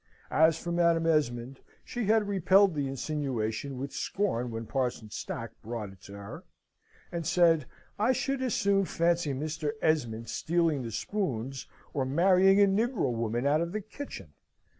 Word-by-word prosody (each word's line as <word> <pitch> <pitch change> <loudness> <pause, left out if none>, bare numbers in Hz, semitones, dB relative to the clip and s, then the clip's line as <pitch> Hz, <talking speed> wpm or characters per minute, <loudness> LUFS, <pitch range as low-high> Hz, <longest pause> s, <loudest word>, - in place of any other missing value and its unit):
As 160 +1 +4
for 175 - -5
Madam 170 -1 +3
Esmond, 135 -5 0 0.3
she 240 -2 -3
had 215 0 +3
repelled 195 0 +4
the 145 -2 -1
insinuation 135 -3 -3
with 135 +2 -5
scorn 125 - -1
when 115 0 -5
Parson 120 -4 -2
Stack - - -5
brought 110 -3 -5
it 95 -1 -18
to 100 - -11
her, 100 0 -9 0.7
and 170 -1 -3
said, 165 -3 +3 0.3
"I 220 +5 +3
should 270 +1 -1
as 255 -4 0
soon 195 -1 +2
fancy 170 -2 +1
Mr. 150 +2 -3
Esmond 120 -9 0
stealing 165 -4 0
the 120 - -5
spoons, 135 - -3 0.3
or 135 - 0
marrying 185 +7 +4
a 200 - +7
negro 200 - +1
woman 115 +2 -1
out 150 +3 +3
of 170 +1 -3
the 215 - -2
kitchen." 215 - -9
155 Hz, 160 wpm, -29 LUFS, 125-190 Hz, 0.7 s, a